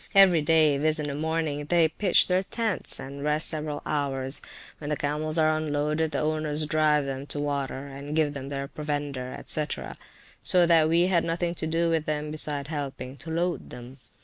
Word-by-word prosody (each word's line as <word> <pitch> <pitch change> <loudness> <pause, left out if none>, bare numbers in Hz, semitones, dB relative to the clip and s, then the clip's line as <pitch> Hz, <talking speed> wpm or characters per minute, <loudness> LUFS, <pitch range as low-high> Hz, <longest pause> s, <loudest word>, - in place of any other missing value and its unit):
Every 190 -5 +7
day, 155 -2 +4
viz. 155 +2 +2
in 150 -1 -2
the - - -3
morning, 155 -1 -2
they 170 +1 +4
pitch 185 +3 +3
their 185 0 +2
tents, 220 +1 -2
and 140 +1 -7
rest 150 +1 +1
several 150 -2 -4
hours. 135 -2 0 0.4
When 145 - -6
the 150 - 0
camels 150 +2 0
are 155 -1 +3
unloaded 155 +1 0
the - - -2
owners 155 0 +1
drive 150 -1 +2
them 135 +1 -5
to 145 - -4
water, 140 -2 -2
and 140 +2 -7
give 155 -2 +2
them 140 -1 -6
their 140 -1 -4
provender, 145 -3 -4
&c. 150 - +3 0.8
So 180 -1 +4
that 165 -2 +5
we 170 +2 +4
had 180 -3 +2
nothing 170 +1 -1
to 160 - -3
do 165 +1 +1
with 160 -1 0
them, 150 0 -2
besides 150 -2 -2
helping 140 -3 -5
to 160 - -9
load 170 +2 -2
them. 125 +2 -10
150 Hz, 190 wpm, -26 LUFS, 145-160 Hz, 0.8 s, Every